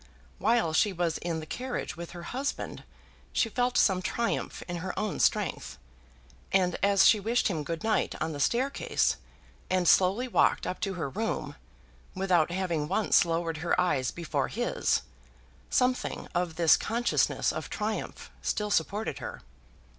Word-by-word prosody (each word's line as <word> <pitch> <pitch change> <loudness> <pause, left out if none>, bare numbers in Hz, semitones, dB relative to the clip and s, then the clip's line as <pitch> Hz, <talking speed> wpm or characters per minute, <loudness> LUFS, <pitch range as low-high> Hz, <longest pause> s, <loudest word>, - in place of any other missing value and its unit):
While 220 -5 +2
she 205 +5 +3
was 175 -3 -1
in 165 -2 -3
the - - -7
carriage 250 +8 -4
with 170 0 -7
her 175 -1 -8
husband 270 +9 -4 0.5
she 225 - +2
felt 245 +2 0
some 190 -2 +4
triumph 235 +5 -2
in 175 -1 -3
her 180 +3 -5
own 215 -3 -2
strength; - - 0 0.7
and 180 -2 +2
as 200 -1 +5
she 215 - +6
wished 230 +4 +1
him 160 -5 -2
good 165 +2 -4
night 220 -1 +1
on 160 - -1
the 145 - -6
staircase, 255 - +1 0.5
and 185 -1 +1
slowly 195 +10 +4
walked 245 - +2
up 185 - -3
to 195 -2 -2
her 165 -5 -2
room, 220 +11 -3 0.6
without 185 -4 +2
having 170 -4 -1
once 210 +1 +3
lowered 165 -1 -1
her 170 +3 0
eyes 135 -9 +1
before 170 -3 -2
his, - - 0 0.7
something 250 0 0
of 175 -2 -1
this 165 -3 +5
consciousness 235 +2 +1
of - - -5
triumph 215 0 -4
still 210 0 -1
supported 205 +5 0
her. - - -7
185 Hz, 155 wpm, -29 LUFS, 170-220 Hz, 0.7 s, she